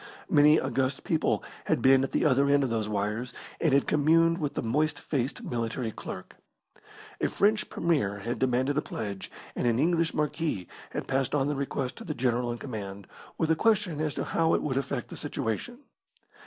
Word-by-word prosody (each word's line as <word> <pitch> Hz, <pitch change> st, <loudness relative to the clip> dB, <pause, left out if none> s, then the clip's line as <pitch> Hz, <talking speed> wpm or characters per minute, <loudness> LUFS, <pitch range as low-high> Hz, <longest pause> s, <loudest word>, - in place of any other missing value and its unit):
Many 150 Hz, +1 st, +6 dB
august 135 Hz, 0 st, -1 dB
people 160 Hz, -2 st, +1 dB, 0.2 s
had -, -, +2 dB
been 135 Hz, 0 st, +5 dB
at 135 Hz, -, -2 dB
the -, -, +1 dB
other 140 Hz, -1 st, +4 dB
end 140 Hz, 0 st, +4 dB
of 130 Hz, -, -1 dB
those 110 Hz, -2 st, -1 dB
wires, 105 Hz, +4 st, -2 dB, 0.3 s
and 160 Hz, -, +2 dB
had 140 Hz, +1 st, +4 dB
communed 165 Hz, +3 st, +3 dB
with 145 Hz, -3 st, -2 dB
the -, -, -2 dB
moist 150 Hz, +6 st, +1 dB
faced 135 Hz, -2 st, -2 dB
military 115 Hz, 0 st, -2 dB
clerk. 95 Hz, -, -8 dB, 0.9 s
A -, -, +2 dB
French 215 Hz, +1 st, +2 dB
Premier 145 Hz, -13 st, 0 dB
had 115 Hz, +5 st, -4 dB
demanded 130 Hz, +3 st, +2 dB
a -, -, -1 dB
pledge, 100 Hz, -8 st, -5 dB, 0.3 s
and -, -, 0 dB
an 115 Hz, -1 st, +3 dB
English 165 Hz, +3 st, +2 dB
marquis 150 Hz, -, -1 dB, 0.2 s
had -, -, -5 dB
passed 135 Hz, +1 st, 0 dB
on 140 Hz, 0 st, +1 dB
the 145 Hz, -, -1 dB
request 135 Hz, -2 st, -3 dB
to 230 Hz, -, -8 dB
the 160 Hz, -8 st, -4 dB
General 120 Hz, -1 st, 0 dB
in 120 Hz, -, -4 dB
command, 100 Hz, -6 st, -6 dB, 0.3 s
with 160 Hz, -1 st, +1 dB
a -, -, +5 dB
question 195 Hz, -5 st, +2 dB
as 155 Hz, -2 st, -1 dB
to -, -, -2 dB
how 165 Hz, 0 st, +2 dB
it -, -, -1 dB
would 140 Hz, -3 st, -1 dB
affect 135 Hz, 0 st, -2 dB
the -, -, -8 dB
situation. 115 Hz, -, -3 dB
135 Hz, 195 wpm, -28 LUFS, 120-155 Hz, 0.9 s, Many